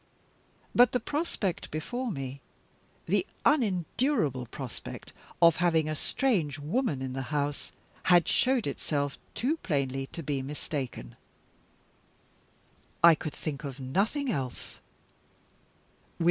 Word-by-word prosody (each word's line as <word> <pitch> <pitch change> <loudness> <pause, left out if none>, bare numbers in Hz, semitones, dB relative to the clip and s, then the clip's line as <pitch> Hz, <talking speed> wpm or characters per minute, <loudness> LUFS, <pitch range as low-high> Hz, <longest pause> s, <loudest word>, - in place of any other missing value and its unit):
But 245 0 +6
the 250 - +3
prospect 285 - -2
before 240 +11 -3
me 135 - -5 0.6
the - - +2 0.2
unendurable 195 - +2
prospect 125 0 -7 0.3
of 170 -1 +7
having 165 -3 +3
a 155 - -1
strange 160 - 0
woman 155 - -1
in 130 -1 -3
the 135 - -2
house 145 -1 -2 0.3
had 175 -2 +6
showed 255 -2 +3
itself 145 0 -2 0.2
too 285 +7 +1
plainly 135 - -1
to 165 - -7
be 140 -2 -1
mistaken. 135 - -5 1.9
I 170 -1 +10
could 155 -1 -4
think 150 -2 -5
of 140 -2 -6
nothing 205 - 0
else. 130 - -4
155 Hz, 110 wpm, -29 LUFS, 135-220 Hz, 1.9 s, I